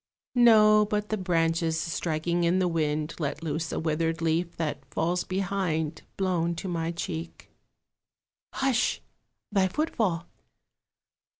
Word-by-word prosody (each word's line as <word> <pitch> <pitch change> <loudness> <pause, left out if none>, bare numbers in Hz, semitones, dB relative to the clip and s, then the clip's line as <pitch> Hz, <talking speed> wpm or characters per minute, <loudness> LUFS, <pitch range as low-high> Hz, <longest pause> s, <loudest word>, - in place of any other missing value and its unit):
No, 215 -3 +6
but 210 0 -2
the 215 - +1
branches 165 -3 +1
striking 170 +1 -1
in 170 +2 +3
the 185 -1 +2
wind 155 -2 -1
Let 150 +1 -3
loose 160 +1 -2
a - - -2
withered 165 +1 0
leaf 165 +1 0
that 150 -4 -2
falls 175 +2 0
behind 180 -5 -1 0.2
Blown 175 -3 0
to 165 - -5
my 165 -2 -1
cheek. 165 -1 -6 1.0
Hush, 265 -3 +1 0.5
thy 195 -2 +3
footfall! 190 - -1
170 Hz, 120 wpm, -27 LUFS, 160-190 Hz, 1.0 s, No